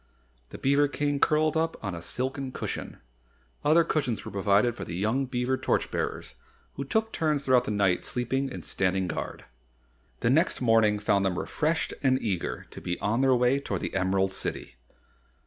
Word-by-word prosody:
The - - -8
beaver 140 +2 +3
King 145 0 -1
curled 155 +1 +3
up 165 +1 0
on 100 -3 -3
a 85 - -6
silken 130 +7 -3
cushion. - - -5 0.7
Other 155 +3 +5
cushions 135 -9 -1
were - - -6
provided 100 +4 +2
for - - -6
the 85 - -6
young 110 +8 0
beaver 125 +1 0
torch - - 0
bearers - - -3 0.4
who 140 - -4
took 220 +10 -1
turns 150 -4 0
throughout 125 -2 +4
the - - -3
night 100 -4 +1
sleeping 130 +2 -1
and - - -7
standing 95 0 0
guard. 85 - -5 0.8
The 115 - +3
next 165 +7 +2
morning 115 -3 +4
found 100 -1 +1
them 95 -2 0
refreshed 160 +1 -1
and 130 -2 +3
eager 95 -6 -3
to - - -9
be 90 0 -3
on 115 +5 0
their 135 -1 +4
way 125 +3 +3
toward 140 - -3
the - - -4
Emerald 95 0 +1
City. 60 - -4
125 Hz, 180 wpm, -27 LUFS, 100-140 Hz, 0.8 s, Other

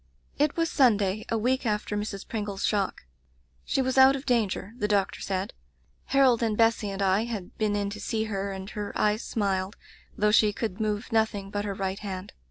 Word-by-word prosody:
'*It 295 +2 +2
was 330 0 +2
Sunday, 210 -6 +3
a 225 - +1
week 255 +4 +1
after 210 -2 -1
Mrs. 205 -1 -4
Pringle's 205 -3 -3
shock. 200 - -1 0.6
She 265 - 0
was 260 +1 +1
out 265 +1 +8
of 275 +1 -6
danger, 220 -5 0
the 210 - +1
doctor 200 -2 0
said. 190 0 -2 0.5
Harold 265 -4 +4
and 220 -2 0
Bessy 225 -2 +3
and 195 0 -2
I 195 +3 +2
had 215 -6 -6
been 210 -1 +1
in 200 -1 -1
to 210 - -7
see 220 +1 -1
her, 200 -2 -3
and 190 0 -6
her 210 -1 -5
eyes 210 +1 +2
smiled, 195 -2 -1 0.4
though 210 0 +3
she 210 -1 +4
could 215 -3 -4
move 215 +2 -2
nothing 215 -3 0
but 205 0 -2
her 200 -1 -3
right 195 0 -3
hand. 190 -2 -6
210 Hz, 195 wpm, -27 LUFS, 195-225 Hz, 0.6 s, out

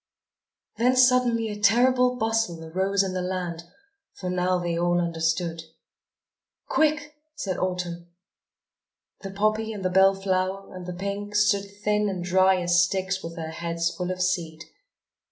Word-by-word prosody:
Then 250 +2 +3
suddenly 250 -3 +3
a 210 0 -6
terrible 250 +4 +4
bustle 225 -8 -1
arose 190 +4 0
in 190 -1 -3
the 185 - -2
land, 180 -2 -4 0.5
for 180 -1 -4
now 180 0 +1
they 175 -1 -2
all 175 +1 +1
understood. 165 0 -1 1.1
"Quick," 300 -1 +1 0.2
said 195 -11 -3
Autumn. 180 -2 -3 1.1
The 195 - -6
poppy 215 +3 0
and 200 -3 -6
the 185 - +1
bell 190 +1 +5
flower 195 0 -2
and 180 -1 -8
the 180 - -4
pink 200 +3 -5
stood 200 -1 +2
thin 210 0 +1
and 185 -2 -4
dry 185 +1 +3
as 175 +1 +4
sticks 190 0 -2
with 165 0 -7
their 160 -2 -5
heads 170 0 -2
full 180 -1 -3
of 185 0 -1
seed. 165 -3 -2
185 Hz, 150 wpm, -25 LUFS, 175-210 Hz, 1.1 s, bell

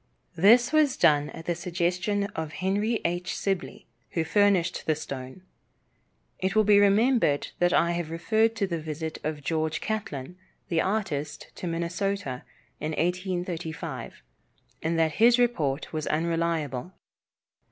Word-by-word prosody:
This 235 - +5
was 300 -4 +3
done 150 -3 +4
at 165 - -10
the 175 - 0
suggestion 180 +4 -1
of 160 -2 -4
Henry 205 +5 0
H. 175 +1 -1
Sibley, 185 -9 -3 0.3
who 165 - +1
furnished 190 -1 +2
the 155 - +3
stone. 135 +3 -7 1.0
It 190 +2 -1
will 215 - +5
be 205 -1 +6
remembered 205 - +3
that 175 0 +3
I 170 0 +3
have 170 -2 -2
referred 220 +7 +1
to 215 -3 0
the 170 -3 -3
visit 160 +1 -5
of 150 -1 -3
George 160 +1 -1
Catlin, 180 -6 -4 0.3
the 165 -2 +2
artist, 175 -8 -2
to 180 - -6
Minnesota, 170 -3 -2 0.4
in 155 +1 -3
1835, 175 - -3 0.6
and 165 +1 0
that 160 -1 +3
his 235 +1 +7
report 160 - 0
was 155 -1 -3
unreliable. 165 -2 -1
170 Hz, 135 wpm, -27 LUFS, 160-200 Hz, 1.0 s, his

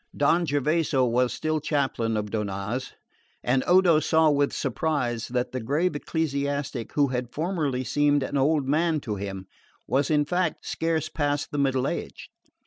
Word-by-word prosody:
Don 165 +4 +3
Gervaso 145 -1 +1
was 125 +1 +1
still 155 0 -1
chaplain 135 -7 -1
of 105 -1 -3
Donnaz; 105 +3 -3 0.5
and 130 +1 +2
Odo 180 -3 +5
saw 160 0 +3
with 145 -1 +2
surprise 125 -4 -1
that 125 0 -2
the 130 - -3
grave 150 +9 0
ecclesiastic 140 -5 -2
who 145 -2 +3
had 125 -1 -3
formerly 150 -4 -1
seemed 145 +3 +2
an 140 - -4
old 140 0 +2
man 160 +2 +2
to 105 -6 -4
him 95 -1 -5 0.4
was 135 +3 +1
in 150 -1 +3
fact 180 0 -1
scarce 160 -2 -1
past 145 -2 -1
the 145 - -2
middle 135 -1 +1
age. - - -5
140 Hz, 155 wpm, -26 LUFS, 125-155 Hz, 0.5 s, Odo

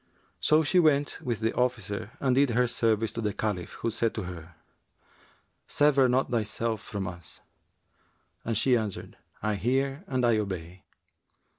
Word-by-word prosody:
So 155 +1 +4
she 180 +5 +3
went 145 -4 +2
with 115 -4 -3
the 110 +1 +1
officer 110 -4 -1
and 130 -2 +2
did 140 +1 +4
her 125 +2 +3
service 115 -2 +1
to 115 - -3
the 105 -2 -1
Caliph, 100 -5 -3
who 115 - +1
said 115 +1 0
to 110 - -3
her, 85 -2 -9 1.1
'Sever 140 -3 +4
not 130 +1 +1
thyself 115 0 -1
from 100 -3 -5
us;'[FN#370] 85 -2 -10 1.0
and 115 -2 0
she 125 +3 +4
answered 110 -5 -3 0.3
'I 110 -1 +1
hear 135 - 0
and 130 -2 0
I 115 -2 +3
obey.' 90 -3 -5
115 Hz, 155 wpm, -28 LUFS, 105-130 Hz, 1.1 s, So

